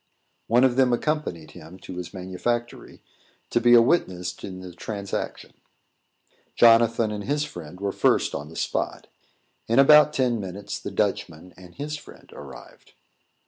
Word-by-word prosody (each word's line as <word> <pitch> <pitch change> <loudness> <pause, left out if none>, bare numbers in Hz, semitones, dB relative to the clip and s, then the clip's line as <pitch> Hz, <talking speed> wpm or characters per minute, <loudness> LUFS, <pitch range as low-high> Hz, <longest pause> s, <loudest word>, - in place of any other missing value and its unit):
One 120 +3 +4
of 130 -1 +3
them 130 -2 +4
accompanied 120 - -2
him 80 +4 -13
to 90 - -9
his 90 -1 -6
manufactory, 105 +6 -4 0.5
to 120 - +2
be 120 0 +6
a 115 - +7
witness 90 - 0
in 95 -1 -7
the 90 -1 -10
transaction. 100 +2 -5 1.0
Jonathan 115 -1 +5
and 105 -1 -5
his 145 +1 0
friend 90 - -9
were 100 0 -2
first - - +1
on 75 +2 -5
the 80 - -13
spot. - - -3 0.6
In 115 - +1
about 150 +2 +7
ten 125 -3 +1
minutes, 100 +1 -6
the - - -6
Dutchman 80 +4 -3
and 90 -1 -15
his 150 +1 -5
friend - - -16
arrived. 70 -2 -13
105 Hz, 150 wpm, -24 LUFS, 90-120 Hz, 1.0 s, a